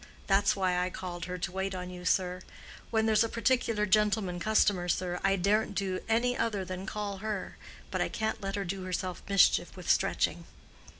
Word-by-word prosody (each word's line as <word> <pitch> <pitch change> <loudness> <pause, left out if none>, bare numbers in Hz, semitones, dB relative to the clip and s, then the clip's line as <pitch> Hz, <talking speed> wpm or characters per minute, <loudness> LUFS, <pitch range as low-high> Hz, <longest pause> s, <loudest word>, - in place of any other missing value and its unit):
That's 200 +1 +3
why 185 -2 +1
I 180 0 0
called 175 -2 -6
her 180 0 -4
to 180 - -3
wait 190 +1 -2
on 180 0 -5
you, 180 0 -9
sir. 180 0 +1 0.5
When 220 -1 +1
there's 220 0 +4
a 230 - -1
particular 230 -2 +1
gentleman 210 -2 +2
customer, 195 -2 +2
sir, 180 0 -1
I 195 0 +3
daren't 200 +2 +1
do 190 -1 -1
any 245 +2 +2
other 205 -6 -1
than 185 +1 -6
call 205 -2 -3
her. 210 -1 -4 0.3
But - - -1
I - - +1
can't 220 -1 -2
let 195 0 -3
her 200 -1 -2
do 190 +2 -4
herself 185 0 -3
mischief 195 -1 +4
with - - -9
stretching." - - +1
195 Hz, 190 wpm, -30 LUFS, 180-215 Hz, 0.5 s, there's